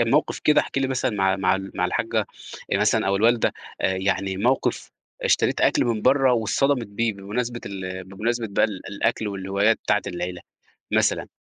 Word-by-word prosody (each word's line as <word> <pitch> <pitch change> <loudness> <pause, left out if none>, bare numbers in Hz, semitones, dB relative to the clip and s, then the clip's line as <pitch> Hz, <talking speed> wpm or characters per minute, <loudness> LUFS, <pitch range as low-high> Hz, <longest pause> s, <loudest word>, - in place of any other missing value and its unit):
موقف 120 +6 +2
كده 150 0 +4
احكِ - - -3
لي 135 - +1
مثلًا 130 -1 0
مع 95 -3 +1
مع 95 -1 +2
ال 95 0 -5
مع - - 0
الحاجّة - - 0 0.5
مثلًا - - +2
أو 100 - +2
الوالدة 115 +3 +3 0.3
آآ 95 - +1
يعني، 95 0 -1
موقف 125 +7 0 0.3
اشتريت - - +2
أكل - - +3
من 115 -3 -1
برّه 135 0 +4
واتصدمِت 125 +2 +1
بيه، 110 +2 -1
بمناسبة 115 +5 -4
ال 95 -1 -5
بمناسبة 115 +5 -2
بقى - - +3
ال 100 -4 -3
الأكل 105 +1 -1
والهوايات 100 +3 +1
بتاعة 105 -1 +1
العيلة 90 0 -4 0.5
مثلًا. - - +1
105 Hz, 170 wpm, -24 LUFS, 95-120 Hz, 0.5 s, كده